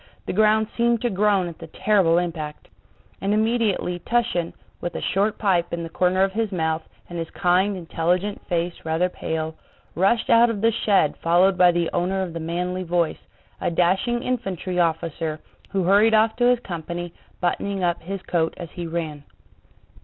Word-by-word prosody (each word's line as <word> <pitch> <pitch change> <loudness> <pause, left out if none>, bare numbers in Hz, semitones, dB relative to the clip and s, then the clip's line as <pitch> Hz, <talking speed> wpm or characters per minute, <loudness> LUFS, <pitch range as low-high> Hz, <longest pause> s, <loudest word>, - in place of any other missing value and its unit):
The - - -3
ground 215 +2 +4
seemed 235 -1 +2
to 240 - +1
groan 200 -1 +2
at 170 - -9
the 165 - -9
terrible 185 -2 +2
impact. 165 -4 -4 0.5
And 200 +2 +1
immediately 215 -5 0
Túshin, 225 -6 0 0.3
with 175 - -4
a - - -3
short 205 +2 +1
pipe 180 -5 +1
in 170 0 -3
the 165 - -6
corner 185 +3 +2
of 195 - +1
his 220 +1 -1
mouth 160 -3 0 0.3
and 175 -1 -6
his 165 - -4
kind, 190 +2 +1
intelligent 180 +4 -1
face 175 0 -1
rather 160 +3 +1
pale, 160 -2 -3 0.4
rushed 195 +6 +2
out 235 +1 +6
of 215 -3 -3
the 230 +1 +4
shed 205 -8 +2
followed 180 +3 +3
by 180 -1 +6
the 170 -1 -1
owner 190 +2 0
of 175 -3 -5
the 165 - -4
manly 180 +3 -2
voice, 175 -2 0 0.4
a - - +1
dashing 190 +8 +1
infantry 195 -8 -2
officer 165 -1 -1 0.3
who 195 -2 0
hurried 205 +5 +5
off 220 +1 +3
to 245 - +2
his 250 - +4
company, 175 -1 -5 0.3
buttoning 190 +2 -1
up 175 -1 0
his 190 +2 -6
coat 165 -2 0
as 170 -3 -8
he 175 -1 -6
ran. 160 -3 -4
180 Hz, 175 wpm, -23 LUFS, 170-205 Hz, 0.5 s, out